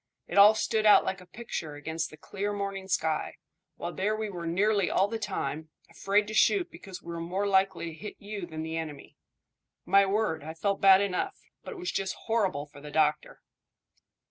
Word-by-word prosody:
It 195 - +1
all 210 +2 +9
stood 220 0 +1
out 210 - +7
like 190 0 -3
a 180 - -15
picture 175 -10 -6
against 160 +2 -3
the 155 - -13
clear 200 +4 -4
morning 195 -1 -4
sky, 160 -4 -1 0.4
while 175 - -5
there 210 +3 0
we 215 -1 -3
were 170 -3 -5
nearly 200 +2 +2
all 195 - +3
the 225 +1 -4
time, 160 -6 -3 0.2
afraid 205 +1 +1
to 215 - -6
shoot 355 - +3
because 190 -2 -10
we 170 - -7
were 170 - -5
more 185 +4 -2
likely 190 -3 +2
to 165 - -6
hit 205 +6 -8
you 200 -3 -6
than 160 -1 -6
the 160 0 -4
enemy. 155 -3 -7 0.7
My 195 0 +5
word, 195 -7 0
I 160 +1 -7
felt 200 +4 -1
bad 195 0 +7
enough, 200 - -2 0.2
but - - -7
it - - -10
was 360 0 -3
just 195 -1 -2
horrible 195 -10 0
for 145 -1 -15
the 150 - -9
doctor." 150 0 0
195 Hz, 200 wpm, -29 LUFS, 160-205 Hz, 0.7 s, all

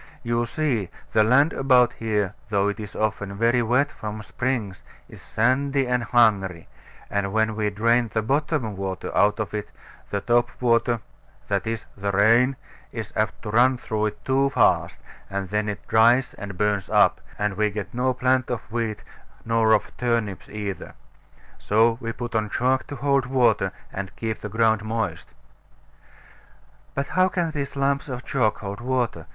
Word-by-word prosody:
You 120 0 0
see, 125 - -1 0.2
the 110 - +4
land 140 +8 +4
about 125 -3 +4
here, 105 -3 -1 0.2
though 100 -1 +2
it 105 - -4
is 105 -3 -8
often 100 -2 -2
very 120 +2 +3
wet 125 +5 +2
from 110 0 -6
springs, 105 - -3 0.3
is - - -13
sandy 135 +4 +1
and 125 0 +1
hungry; 100 -7 +2 0.4
and 100 -1 -1
when 110 +1 +1
we 105 -1 0
drain 115 +3 +2
the 110 0 0
bottom 140 -3 0
water 95 -1 -4
out 105 +2 +3
of 110 - -3
it, 105 -1 -4 0.4
the 100 - -1
top 120 +3 +2
water 115 -1 +2 0.5
(that 100 0 0
is, 115 -1 -3
the 100 0 -3
rain) 115 +7 +4 0.4
is 115 -2 -6
apt 110 0 -1
to 105 - -4
run 125 +3 +4
through 110 -3 -1
it 105 - -8
too 135 +1 +2
fast: - - +2 0.3
and 100 -1 -3
then 105 0 0
it 105 -1 -6
dries 120 +3 +4
and 100 -3 -8
burns 105 -1 0
up; - - +4 0.2
and 105 -1 0
we 105 +1 +1
get 105 -1 -6
no 125 +2 +1
plant 130 0 +1
of 120 - -2
wheat, 115 -2 -2 0.4
nor 115 -1 +2
of 110 - +2
turnips 115 -6 -1
either. 100 -4 -6 0.6
So 115 +2 +2
we 115 - -3
put 120 0 -6
on 110 -1 0
chalk 130 +4 +1
to 145 - -6
hold 140 -1 +1
water, 115 -7 +2 0.2
and 95 -2 -5
keep 110 -1 -4
the 105 - -5
ground 110 0 +2
moist. 110 +1 -3 1.6
But 140 - -1
how 185 0 +3
can 175 -3 -1
these 140 -3 -4
lumps 140 +1 0
of 125 -1 -6
chalk 115 -6 0
hold 100 +1 -6
water? 125 -2 -1
115 Hz, 170 wpm, -24 LUFS, 105-125 Hz, 1.6 s, the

